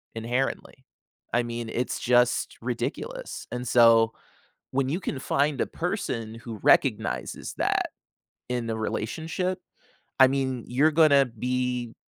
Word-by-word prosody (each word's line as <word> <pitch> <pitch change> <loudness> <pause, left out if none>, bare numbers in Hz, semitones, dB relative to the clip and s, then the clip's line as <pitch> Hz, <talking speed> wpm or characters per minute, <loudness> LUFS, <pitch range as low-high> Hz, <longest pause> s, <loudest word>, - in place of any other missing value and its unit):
inherently. 120 +4 -3 0.5
I 120 +1 +3
mean, 120 -1 -5
it's 125 +2 -2
just 125 0 +2
ridiculous. 135 - -4
And 125 0 -4
so 115 -1 +5 0.6
when 135 0 0
you 165 - -1
can 140 -8 -4
find 140 +1 0
a - - 0
person 125 - -3
who 115 -2 -8
recognizes 60 +1 +1
that, - - +1 0.6
in 120 -2 -2
the 110 - -1
relationship, 160 - -2 0.6
I 130 - +9
mean 130 -2 -1
you're 145 +6 +3
gonna 150 -3 +5
be 125 0 -2
125 Hz, 125 wpm, -26 LUFS, 115-140 Hz, 0.6 s, I